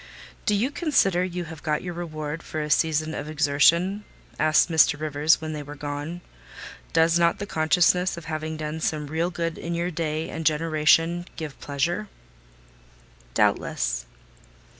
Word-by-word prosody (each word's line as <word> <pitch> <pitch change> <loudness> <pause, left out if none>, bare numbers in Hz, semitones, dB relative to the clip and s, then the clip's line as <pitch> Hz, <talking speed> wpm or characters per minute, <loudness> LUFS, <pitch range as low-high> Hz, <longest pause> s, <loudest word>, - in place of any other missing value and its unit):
"Do 210 - +4
you 240 +7 0
consider 240 - +2
you 180 -1 -3
have 160 -2 -9
got 150 -1 -1
your 180 -1 -4
reward 155 -2 -5
for 155 - -5
a 150 0 -3
season 160 0 +2
of 150 0 -5
exertion?" 160 +7 +3 0.4
asked 155 0 +4
Mr. 160 -3 +4
Rivers, 155 +1 +2
when 155 0 -5
they 150 - -4
were 145 0 -9
gone. 145 +4 -5 0.7
"Does 165 +1 +4
not 170 0 +3
the 200 - -4
consciousness 180 +2 +2
of 170 - -8
having 155 0 -4
done 155 +1 -4
some 155 -1 -1
real 160 +4 -1
good 170 -2 -3
in 170 0 -3
your 170 +1 -1
day 155 -1 -2
and 165 - -5
generation 165 +2 +2
give 155 -4 -7
pleasure?" 165 +9 -2 1.3
"Doubtless." - - 0
160 Hz, 155 wpm, -25 LUFS, 150-170 Hz, 1.3 s, Do